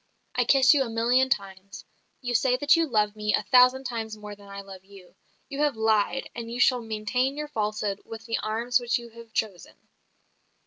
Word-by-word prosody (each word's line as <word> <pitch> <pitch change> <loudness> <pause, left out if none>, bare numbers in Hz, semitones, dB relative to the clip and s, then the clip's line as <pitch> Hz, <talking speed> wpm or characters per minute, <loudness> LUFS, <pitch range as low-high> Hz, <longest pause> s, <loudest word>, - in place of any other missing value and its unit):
"I - - +1
kiss 265 -1 +6
you 290 - +2
a 255 - -1
million 240 +3 +2
times. 195 -3 -4 0.4
You 245 -2 -3
say 250 +2 +2
that 290 +3 +4
you 330 -1 +1
love 210 -4 +1
me 210 0 +1
a - - -2
thousand 255 +1 +5
times 225 -4 -5
more 210 -1 -9
than 200 0 -17
I 200 0 -8
love 190 -1 -12
you. 195 -2 -16 0.3
You 280 -1 -7
have 295 -4 +1
lied, 220 +3 +1
and 230 -1 -7
you 240 +1 -5
shall 250 0 +4
maintain 225 +5 -2
your 300 0 -5
falsehood 210 -5 -2
with 225 0 -10
the 225 -1 -2
arms 230 +3 0
which 240 -1 0
you 235 -1 -10
have 230 0 -14
chosen. 200 -5 -4
230 Hz, 205 wpm, -26 LUFS, 210-255 Hz, 0.4 s, kiss